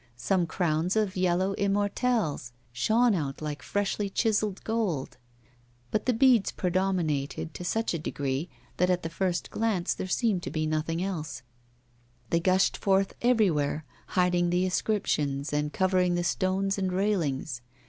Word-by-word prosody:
Some 175 +8 +1
crowns 170 +2 0
of 210 -3 +1
yellow 185 +1 +1
immortelles 200 - 0 0.2
shone 225 - +3
out 145 -7 -2
like 150 -2 -4
freshly 205 0 -1
chiselled 210 -1 0
gold. 210 - -2 0.7
But 215 - -1
the 250 - +4
beads 240 -3 +4
predominated 170 -5 -1
to - - -7
such 225 +4 0
a 165 - -2
degree 145 +1 -3 0.3
that 180 +1 +2
at 180 -1 +1
the 165 - -4
first 175 0 -1
glance 215 -6 0
there - - -5
seemed 200 -1 +1
to - - -5
be 155 0 -1
nothing 155 +2 -1
else; 155 -8 -4 0.9
they 170 - +3
gushed 185 +2 +2
forth 195 0 +2
everywhere, 170 -11 +2 0.3
hiding 180 -1 +3
the 180 +1 +2
inscriptions 150 -8 -1
and 150 0 0
covering 185 -1 +2
the 175 - 0
stones 190 +2 0
and 190 -1 0
railings. 160 -10 -1
180 Hz, 145 wpm, -28 LUFS, 155-200 Hz, 0.9 s, the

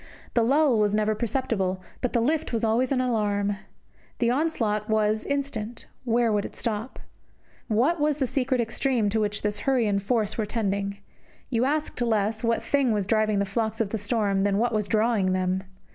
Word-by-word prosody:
The 235 - +3
lull 270 0 +3
was 210 -1 +2
never 215 0 +2
perceptible, 215 -5 -1 0.2
but 250 - -1
the 235 - +2
lift 305 +6 0
was 230 -1 -1
always 230 +4 +2
an 265 - +2
alarm. 205 -4 0 0.6
The 235 -1 +2
onslaught 230 -8 0
was 215 0 +2
instant, 250 -5 -3 0.2
where 235 -1 +2
would 205 -1 +1
it - - -8
stop? 225 +1 -3 0.7
What 260 +9 +2
was 295 -1 +1
the 275 - +1
secret 255 0 0
extreme 230 -1 0
to 220 +2 0
which 210 -1 -1
this 210 0 -1
hurry 260 -1 +2
and 200 -1 +1
force 215 +1 0
were 215 - 0
tending? 200 -2 -1 0.5
You 235 0 +2
asked 295 -2 -1
less 220 -1 0
what 230 0 +1
thing 275 -4 +2
was 205 -2 0
driving 215 0 +2
the 200 - +1
flocks 220 +2 -2
of 215 -3 0
the 225 - -2
storm 205 -2 0
than 200 0 +2
what 235 +2 +1
was 210 -2 0
drawing 215 -4 +2
them. 185 0 0
220 Hz, 190 wpm, -26 LUFS, 210-245 Hz, 0.7 s, The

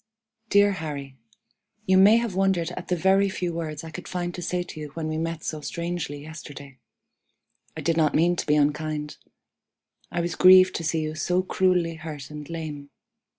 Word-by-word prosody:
"DEAR 205 0 +5
HARRY: 145 -7 -5 0.7
You 190 -2 +4
may 205 +4 +7
have 235 -4 -1
wondered 190 -3 +1
at 175 0 -7
the 180 - +1
very 190 +3 +3
few 180 -2 -3
words 155 -2 -5
I 160 - -8
could 175 +3 -8
find 175 -1 -3
to 180 - -6
say 180 +1 -1
to 165 - -10
you 150 - -5
when 160 -1 -3
we 155 0 -2
met 165 0 -3
so 155 -1 -4
strangely 170 -3 -4
yesterday. 145 -4 -10 1.0
I - - -4
did 165 -1 0
not 155 -2 +2
mean 175 +3 +3
to - - -3
be 150 - +4
unkind. 150 0 -1 0.9
I - - -2
was 170 0 -2
grieved 185 0 +7
to 165 - -5
see 160 0 0
you 155 0 -3
so 180 +4 0
cruelly 180 -3 +1
hurt 155 -3 -8
and 150 0 -8
lame. 155 -4 -6
165 Hz, 190 wpm, -25 LUFS, 150-180 Hz, 1.0 s, may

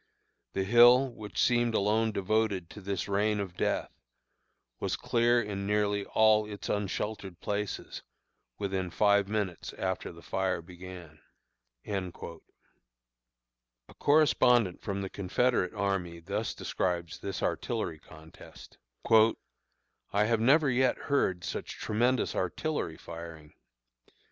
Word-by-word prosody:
The 95 - 0
hill, 120 +5 +6
which 105 -2 -7
seemed 120 -2 +3
alone 110 +2 +2
devoted 100 -3 0
to 105 - -10
this 100 -1 -3
rain 105 +1 +1
of 95 -3 -4
death, - - -1 0.9
was - - -1
clear 120 +1 +2
in 100 -3 -3
nearly 105 -1 +1
all 110 -1 +4
its 100 - -7
unsheltered 100 -2 -3
places 105 0 -4 0.6
within 95 -2 -2
five 100 +2 +3
minutes 100 -5 -3
after 95 -1 -3
the 85 0 -14
fire 95 -2 -1
began." 90 -2 -11 0.7
A 95 -3 -2 1.9
correspondent 125 - +4
from 100 -1 -3
the 95 - -4
Confederate 100 +1 0
army 95 -4 -2
thus 100 +6 -3
describes 85 -2 -2
this 100 -2 -5
artillery 95 -9 -2
contest: 80 0 -15 0.3
"I 110 -2 0
have 115 0 +1
never 140 +4 +4
yet 130 0 +2
heard 95 -11 0
such - - -5
tremendous 120 +3 +1
artillery 95 - -2
firing. 85 -2 -10
100 Hz, 115 wpm, -30 LUFS, 90-110 Hz, 1.9 s, hill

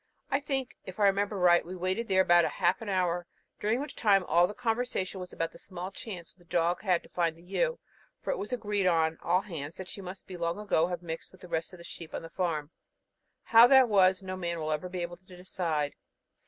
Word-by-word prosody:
I 275 - +3
think, 270 -3 -3
if 185 +2 -9
I - - +3
remember 200 +1 +2
right, 175 -2 +5
we 180 +2 -7
waited 185 +6 -1
there 190 -1 +4
about 175 -1 +6
half 175 +6 +1
an 220 - -5
hour, 175 -2 0 0.3
during 215 +4 +1
which 290 0 -6
time 200 -4 +4
all 175 +1 +4
the 210 - -8
conversation 225 -5 -1
was 180 0 -7
about 165 0 -2
the 170 - -14
small 185 0 -7
chance 185 -5 -8
which - - -41
the 175 -1 -24
dog 170 +1 +1
had 185 -5 +1
to - - -17
find 170 -2 0
the 165 - -18
ewe, 485 - 0 0.4
for - - -2
it - - -2
was 205 - -4
agreed 210 -5 0
on 165 -2 +2
all 180 +1 +2
hands 165 -6 -7
that 190 - -7
she 200 - -7
must 185 0 -9
long 170 -1 -2
ago 200 -6 +2
have 175 -1 -4
mixed 165 -1 -6
with 185 - -19
the 180 - -10
rest 165 +1 -2
of 180 - -11
the 170 - -12
sheep 170 -1 -9
on - - -5
the 165 - -9
farm. 160 -5 -2 0.7
How 230 +1 +8
that 265 -1 +7
was, 190 -2 +4
no 185 0 -4
man 170 -2 -3
will 155 -1 -2
ever 155 +4 -2
be 180 -1 -3
able 175 0 -6
to 185 0 -15
decide. 165 -5 -2
185 Hz, 240 wpm, -30 LUFS, 170-200 Hz, 0.7 s, How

